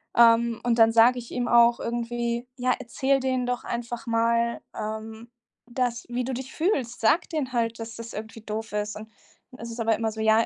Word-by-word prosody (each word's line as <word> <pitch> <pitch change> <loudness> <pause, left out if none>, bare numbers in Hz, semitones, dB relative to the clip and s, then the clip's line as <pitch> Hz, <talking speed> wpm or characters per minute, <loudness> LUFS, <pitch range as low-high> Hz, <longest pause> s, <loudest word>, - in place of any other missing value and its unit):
Ähm, 235 0 +5
und 240 -1 +1
dann 225 0 +6
sage 240 +2 +6
ich 235 - -10
ihm 245 -1 -2
auch 235 0 +5
irgendwie: 235 +1 -2
„Ja, 250 0 +1
erzähl 270 +3 0
denen 255 -1 0
doch 245 0 -2
einfach 235 0 -5
mal, 230 +1 +1
ähm, 220 +2 -6 0.4
dass 240 -1 -1
wie 245 +1 -2
du 260 +1 -3
dich 260 +1 -6
fühlst. 275 - -1
Sag 225 +9 +3
denen 295 -6 -2
halt, 230 -2 0
dass 225 -1 -7
das 230 0 -8
irgendwie 220 +1 -7
doof 220 0 -5
ist.“ 210 0 -2
Und 220 +1 -10 0.4
dann 255 - -14
ist 230 0 -7
es 230 - -8
aber 225 -1 +2
immer 220 0 -1
so, 220 0 -6
ja 220 +1 +4
235 Hz, 205 wpm, -26 LUFS, 225-245 Hz, 0.4 s, dann